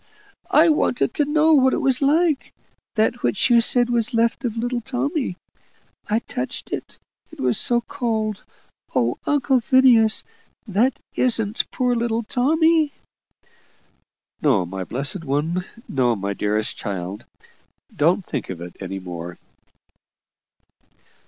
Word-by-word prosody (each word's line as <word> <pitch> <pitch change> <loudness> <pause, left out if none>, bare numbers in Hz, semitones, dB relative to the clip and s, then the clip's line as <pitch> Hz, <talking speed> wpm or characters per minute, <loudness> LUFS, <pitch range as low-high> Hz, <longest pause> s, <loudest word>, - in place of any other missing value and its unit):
I 325 +2 +5
wanted 300 -5 +1
to 295 - +1
know 310 +2 +3
what 260 -3 +4
it - - -1
was 265 -1 +1
like 305 +1 +2 0.4
that 225 +2 +1
which 205 - +1
you 235 -1 +6
said 245 +1 +3
was 235 -1 0
left 230 +3 +1
of 230 -2 -3
little 240 +1 -2
Tommy. 265 - -2 0.7
I 215 - +2
touched 130 - -4
it - - -6 0.3
it - - -14
was 125 -1 +1
so 240 -1 +1
cold. 220 -4 -2 0.5
Oh! 120 -1 +1
Uncle 270 -3 +2
Phineas! 235 -3 +5 0.4
THAT 220 +6 +1 0.2
isn't 225 -3 0
poor 250 -2 0
little 230 0 -1
Tommy?" 315 +6 +2 1.5
"No, 125 - +3
my 95 +2 -5
blessed 140 - -3
one 160 +6 -1 0.2
no, 125 -4 +1
my 100 0 -3
dearest 105 +2 -1
child! 95 0 -5 0.7
Don't 170 +5 +2
think - - -4
of 90 -3 -5
it 85 0 -9
any 95 0 -5
more." 90 -2 -7
225 Hz, 130 wpm, -22 LUFS, -, 1.5 s, you